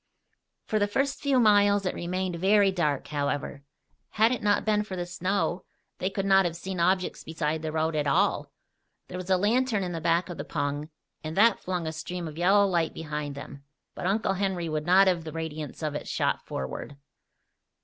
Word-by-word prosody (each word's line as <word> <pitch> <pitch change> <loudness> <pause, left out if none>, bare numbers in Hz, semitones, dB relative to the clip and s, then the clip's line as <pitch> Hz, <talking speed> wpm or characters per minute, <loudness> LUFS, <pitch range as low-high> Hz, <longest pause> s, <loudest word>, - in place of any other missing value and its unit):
For 215 - 0
the 205 - +2
first 275 +6 -1
few 275 -3 +2
miles 205 -3 +4
it 185 - 0
remained 180 0 -3
very 195 +2 +4
dark, 155 -6 -1
however. 145 -1 -2 0.5
Had 220 +2 +4
it 250 - -1
not 205 -1 +2
been 210 -1 +2
for 210 -3 -6
the 175 -1 -3
snow 185 +2 -1 0.4
they 185 - 0
could 195 0 -3
not 195 0 +5
have 170 -2 -2
seen 185 +1 -5
objects 185 +2 +1
beside 160 -1 -2
the 160 -1 -3
road 160 0 0
at 150 -1 0
all. 140 - +1 0.6
There 180 - -5
was 185 0 -7
a 185 - +4
lantern 220 +1 +1
in 180 - -3
the 165 -1 -4
back 170 +2 +2
of 175 - -8
the - - -2
pung 145 +2 -3 0.3
and 155 +2 -5
that 225 +3 +5
flung 180 -2 -3
a 160 - -2
stream 175 +2 -5
of 155 - -8
yellow 200 +3 +5
light 170 -4 0
behind 150 -2 -4
them; 140 0 -9 0.3
but - - -4
Uncle 195 0 +1
Henry 190 -3 -1
would 155 0 -3
not 190 +2 +6
have 180 -3 +1
the 160 - -6
radiance 160 -1 -6
of 155 -1 -1
it 150 - -5
shot - - 0
forward. 65 - -5
180 Hz, 200 wpm, -27 LUFS, 155-200 Hz, 0.6 s, not